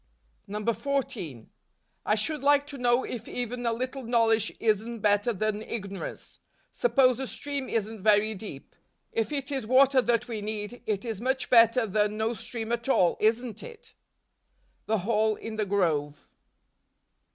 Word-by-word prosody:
14. 210 - -3 0.6
I 210 - +4
should 285 +7 -1
like 285 0 +4
to 285 -2 -9
know 245 +1 +3
if 235 -2 -6
even 245 0 -3
a - - +2
little 255 +4 -3
knowledge 225 -2 +2
isn't 225 +1 0
better 205 +3 +3
than 215 0 -1
ignorance: 200 -3 -6 0.3
Suppose 265 - +3
a 265 - -3
stream 280 -1 -4
isn't 220 -1 -2
very 215 +1 +4
deep; 190 -9 -9 0.4
if 225 +3 -1
it 280 -1 -3
is 265 -6 -2
water 260 +1 +5
that 240 -1 +1
we 225 -3 -4
need, 215 +2 -5
it 210 0 -1
is 225 -3 -4
much 265 +1 -1
better 230 0 +6
than 210 0 0
no 220 +2 0
stream 230 0 -5
at 235 +2 -2
all, 180 -9 +4
isn't 225 0 +1
it? 470 -3 -11 0.9
The 220 - +2
Hall 220 -1 +2
in 220 0 -7
the 215 -2 -1
Grove. 155 -7 0
225 Hz, 150 wpm, -28 LUFS, 210-250 Hz, 0.9 s, better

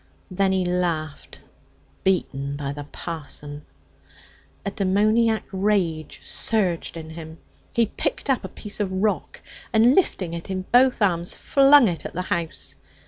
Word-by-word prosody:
Then 190 +1 +2
he 190 -1 +1
laughed. 170 -4 -2 0.6
'Beaten 140 -7 0
by 140 -1 -4
the 145 0 -7
parson!' 145 -2 -7 1.0
A 200 - -1
demoniac 215 +3 +2
rage 190 -6 0
surged 185 -7 -1
in 160 -1 -8
him. 160 0 -9 0.3
He 235 - +3
picked 215 - -3
up 270 -3 +1
a - - -4
piece 210 0 -4
of 200 -3 -1
rock, 200 +3 -1 0.3
and 230 +3 +5
lifting 190 - +1
it 170 +3 -6
in 185 -1 -2
both 250 -2 +5
arms, 175 -3 +1
flung 275 -2 +6
it 170 -4 -3
at - - -7
the 180 - -1
house. 165 -2 -4
185 Hz, 140 wpm, -24 LUFS, 165-215 Hz, 1.0 s, flung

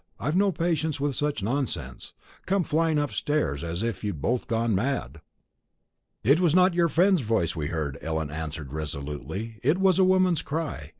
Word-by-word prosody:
I've 150 - -1
no 200 +1 +3
patience 160 -3 -1
with 140 -1 -1
such 145 -7 -1
nonsense; 130 +4 -3 0.3
coming 195 -2 +1
flying 160 0 +1
upstairs 145 - -1
as 85 +4 -3
if 115 -1 -3
you'd 100 -7 -3
both 120 - -1
gone 115 -1 +1
mad." 110 - -2 1.0
"It 140 +8 +5
was 175 -3 +3
not 185 0 +5
your 170 0 +3
friend's 180 +2 +3
voice 105 -8 0
we 75 -3 -2
heard," 75 -4 -3
Ellen 80 -2 -2
answered 75 -2 -6
resolutely; 75 - -5
"it 150 +7 +2
was 190 -1 +4
a - - +6
woman's 185 -2 +3
cry. 145 - -4
130 Hz, 170 wpm, -26 LUFS, -, 1.0 s, a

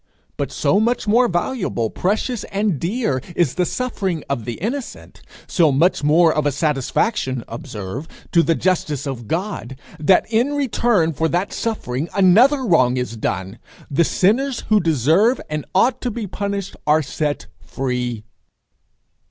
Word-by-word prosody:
But - - -3
so 200 - +2
much 235 0 0
more 240 +4 +4
valuable, 175 - -1
precious, 215 +5 -1
and 195 -6 -1
dear, 170 - -1
is 165 -7 +2
the 180 -1 0
suffering 195 - -2
of 130 -5 -3
the 120 - -3
innocent, 245 - -6 0.2
so 165 -4 +3
much 160 +5 +2
more 160 +2 +4
of 150 -1 0
a - - +2
satisfaction 140 - 0
observe 115 0 -6 0.2
to 170 - +5
the 165 +1 +2
justice 160 -7 -1
of 125 -5 -5
God, 165 - -3 0.2
that 180 +5 +4
in 245 +6 +2
return 235 - +1
for 160 +3 0
that 180 +4 -1
suffering 160 - -3
another 230 +9 +5
wrong 130 - +3
is 125 -2 -3
done: 95 -1 -3 0.3
the 145 +5 +3
sinners 235 - +1
who 215 -1 +5
deserve 165 - +3
and 150 -1 -3
ought 245 +6 +3
to 250 - -1
be 230 -1 -4
punished 200 0 -4
are 155 +1 +4
set 145 +2 -3
free. 125 -4 -3
170 Hz, 150 wpm, -20 LUFS, 135-215 Hz, 0.3 s, to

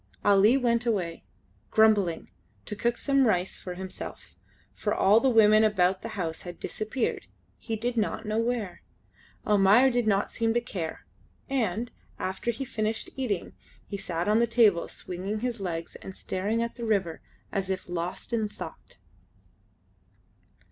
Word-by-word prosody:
Ali 205 +5 +6
went 240 -2 +1
away, 180 -7 -1 0.4
grumbling, 210 -6 +3 0.3
to 210 - -4
cook 235 +3 0
some 275 -2 +3
rice 185 -3 0
himself, 185 +1 -7 0.4
for - - -1
all 205 +3 +5
the 265 - +3
women 215 -2 +6
about 190 -3 +2
the 225 -2 -7
house 165 -3 -3
had 175 -2 -9
disappeared; 220 +3 -3 0.3
he 225 - -3
did 240 +2 -2
not 220 +1 -1
know 215 +1 0
where. 230 -5 -2 0.6
Almayer 210 +6 +5
did 240 -2 0
not 200 -1 +2
seem 225 0 0
to - - +4
care, 185 -9 -5 0.4
and, 235 -4 -1 0.3
after 190 +5 -3
he 235 +4 -2
finished 220 -2 -2
eating, 230 -9 -2 0.3
he 205 - -6
sat 175 -3 -3
on 215 +2 +4
the 235 - +3
table 220 -7 +4
swinging 195 +4 -5
his 245 -2 -2
legs 165 -3 -4
and 190 - -10
staring 210 +5 -1
at 235 - -5
the 235 - -6
river 190 -7 0 0.3
as 195 -2 -2
if 190 -1 -3
lost 175 +5 -4
in 220 -2 +1
thought. 210 - -10
215 Hz, 150 wpm, -28 LUFS, 190-235 Hz, 0.6 s, Ali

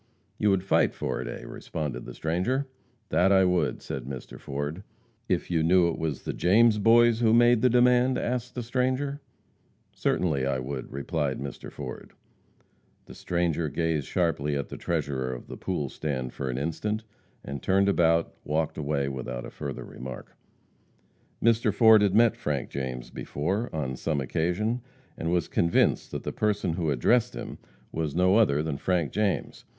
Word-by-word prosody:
"You 105 - +3
would 95 -2 +2
fight 95 - +2
for - - -2
it, - - -5
eh?" - - -6
responded 70 -6 -5
the - - -8
stranger. 95 - -1 0.4
"That 95 +2 +3
I 95 -1 +5
would," 90 -1 0
said 65 -3 -5
Mr. 65 -1 -8
Ford. 75 +5 -4 0.5
"If - - 0
you 80 -2 +2
knew 85 +1 +4
it 85 - -4
was 80 -5 -3
the - - -3
James 110 +4 +4
Boys 115 +2 +5
who 115 -2 +4
made 120 -1 +5
the 125 - +5
demand?" 125 +1 +4
asked 125 0 -2
the 125 - -3
stranger. 130 +4 -1 0.7
"Certainly 75 -7 0
I 70 -1 0
would," 65 +1 -5
replied 70 0 -2
Mr. 70 0 -7
Ford. - - -8 0.9
The - - -12
stranger 85 -3 -1
gazed 80 -1 -1
sharply 75 -5 0
at 70 - -3
the - - -6
treasurer 70 -6 -2
of 60 - -7
"the - - -8
pool 85 -7 -2
stand" 65 -3 -4
for 65 - -4
an 60 - -2
instant, 105 +9 -2 0.4
and, 70 0 -5
turning 95 +1 +3
about, 85 -3 +2
walked 80 +1 -1
away 70 -2 -1
without 65 -2 -5
further 70 -3 -5
remark. 65 +1 -9 1.1
Mr. 115 -1 +3
Ford 110 +1 +7
had 100 -1 +2
met 115 0 +5
Frank 70 -4 -3
James 65 -2 -5
before, 95 +11 -2
on 65 -5 -3
some 75 +3 -1
occasion, 90 - -1 0.3
and 80 - -2
was 90 -1 +1
convinced 85 0 +2
that - - -5
the - - -4
person 105 -5 0
who 85 -2 -1
addressed 110 - +2
him - - -7 0.3
was 80 -2 -3
no 95 +3 +4
other 75 -10 +3
than 80 -3 -2
Frank 85 -4 0
James. 105 -2 -1
85 Hz, 165 wpm, -27 LUFS, 70-105 Hz, 1.1 s, Ford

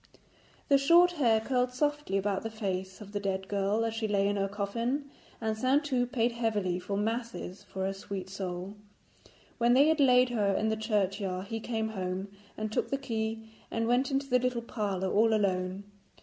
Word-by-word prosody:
The 280 -1 +5
short 340 +5 +6
hair 240 -10 +3
curled 250 +2 0
softly 290 -6 0
about 195 0 0
the 225 - -4
face 190 -3 -4
of 200 -1 -10
the 205 - -2
dead 190 -1 -2
girl 200 +3 +1
as 225 - -1
she 225 -1 -2
lay 200 -1 +2
in 205 - 0
her 195 -1 0
coffin, 230 +8 -2 0.3
and 220 -1 -1
Saintou 255 +1 +1
paid 240 -2 +2
heavily 210 -6 -1
for 200 +2 -3
masses 225 -3 -3
for 190 0 -4
her 195 - -1
sweet 195 -1 -6
soul. 190 0 -5 0.9
When 240 +1 +4
they 285 +4 +6
had 320 -1 +2
laid 250 -2 +5
her 205 -5 +1
in 220 - +1
the 220 - +1
churchyard 195 -3 -1
he 225 - -2
came 220 -1 -2
home, 190 -1 -3 0.3
and 215 0 -3
took - - -1
the 275 - 0
key, 225 -3 -3 0.2
and 225 0 -1
went 245 +3 +2
into 275 0 0
the 250 -1 +3
little 250 -1 -1
parlour 200 -5 -2
all 220 +1 +4
alone. 190 -1 0
220 Hz, 190 wpm, -30 LUFS, 195-245 Hz, 0.9 s, short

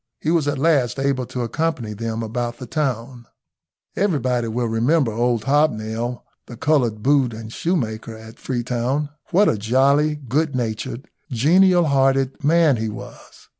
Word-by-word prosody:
He 155 - -1
was 165 -4 +1
at 145 -1 0
last 140 -5 +2
able 135 -2 -1
to 125 - -4
accompany 125 -4 -2
them 115 +1 -4
about 120 +1 -3
the 125 - -8
town. 125 -5 -3 0.7
Everybody 130 - 0
will 120 +2 -1
remember 120 +4 +1
old 120 0 0
Hobnail, 120 -4 0 0.2
the 120 - -10
coloured 120 -7 +1
boot 135 -4 +2
and 110 0 -9
shoe 175 +3 0
maker 110 -5 -4
at 110 +1 -13
Freetown. 125 +3 -2 0.2
What 200 +4 +4
a 105 - +1
jolly, 140 +7 +2
good 145 +1 -1
natured, 120 +2 -4 0.2
genial 175 +8 +4
hearted 135 -2 +1
man 155 -3 +4
he 110 0 -2
was! 105 - -11
125 Hz, 150 wpm, -21 LUFS, 115-145 Hz, 0.7 s, What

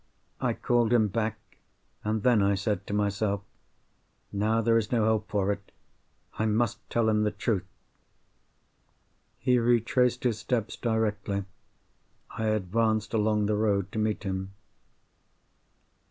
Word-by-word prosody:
I - - +1
called 120 -2 +1
him 110 -3 +4
back—and 110 0 -5
then 120 -4 +4
I 100 0 +3
said 100 0 -2
to - - -4
myself, 100 0 0 0.9
"Now 110 +3 +1
there 115 0 +3
is 105 - -4
no 115 -3 +2
help 110 -1 +1
for 100 -1 +1
it. 100 0 -6 0.7
I 110 - +2
must 110 +1 +1
tell 115 -1 +1
him 105 -1 +3
the 105 - +2
truth!" 105 -1 -2 1.7
He 125 -1 +2
retraced 120 +1 +2
his 115 -4 0
steps 115 -5 -1
directly. 105 -4 -1 0.9
I 110 - -3
advanced 110 +1 0
along 105 -1 +2
the 105 - +1
road 100 -3 +1
to 110 - -3
meet 110 0 -1
him. 95 0 -4
110 Hz, 130 wpm, -28 LUFS, 100-115 Hz, 1.7 s, him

